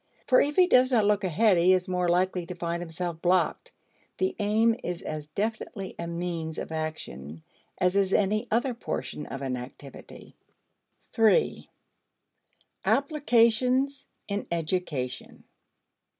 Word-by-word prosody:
For 255 - +5
if 290 +1 0
he 365 - +6
does 255 -6 +4
not 225 -4 +3
look 210 0 +2
ahead, 185 +2 +3
he 180 +2 +5
is 185 0 +1
more 180 -1 0
likely 180 +1 +1
to 180 - -6
find 170 0 -3
himself 170 0 -5
blocked. 185 - +1 0.5
The 375 - 0
aim 220 +2 +3
is 175 -1 -4
as 150 -1 -5
definitely 200 +2 -4
a 170 - -4
means 170 -2 -4
of - - -5
action 120 - -5 0.3
as 180 +1 +1
is 195 -1 +2
any 215 +4 +1
other 245 +3 +1
portion 230 -9 -5
of 135 0 -6
an 130 -1 -2
activity. 130 +2 -11 0.8
3. 225 - +2 1.1
Applications 265 -1 +2 0.2
in 200 0 -3
Education. 160 -6 -3
185 Hz, 135 wpm, -27 LUFS, 170-225 Hz, 1.1 s, he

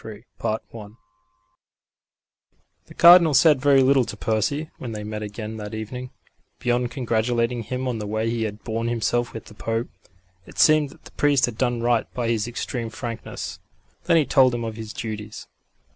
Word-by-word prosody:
CHAPTER 110 +1 0 0.2
III 115 - -7
I 105 - -10 2.0
The - - -14
Cardinal 170 -3 +8
said 140 +1 +5
very 140 -1 +5
little 135 0 +4
to 105 - -7
Percy 115 +9 -1
when 120 -3 -6
they 105 -1 -5
met 105 0 -5
again 105 +1 -6
that 105 0 -6
evening, 125 +4 -6 0.5
beyond 120 0 0
congratulating 120 -1 0
him 125 +4 -4
on 120 -3 -2
the 105 - -5
way 110 +2 -1
he 115 -1 -1
had 105 0 -6
borne 115 0 -2
himself 120 0 0
with 115 - -8
the - - -13
Pope. 115 +2 -3 0.6
It - - -14
seemed 155 -2 +5
that - - -18
the - - -13
priest 145 -2 +3
had 120 - -6
done 120 -1 -1
right 120 -1 +1
by 120 -2 -1
his 115 -1 0
extreme 120 0 -4
frankness. 115 +1 -6 0.5
Then 170 -2 +4
he 155 - +3
told 130 -2 +4
him 120 - -3
of 110 -1 -4
his 110 -1 -7
duties. 110 -1 -6
115 Hz, 180 wpm, -23 LUFS, 110-130 Hz, 2.0 s, Cardinal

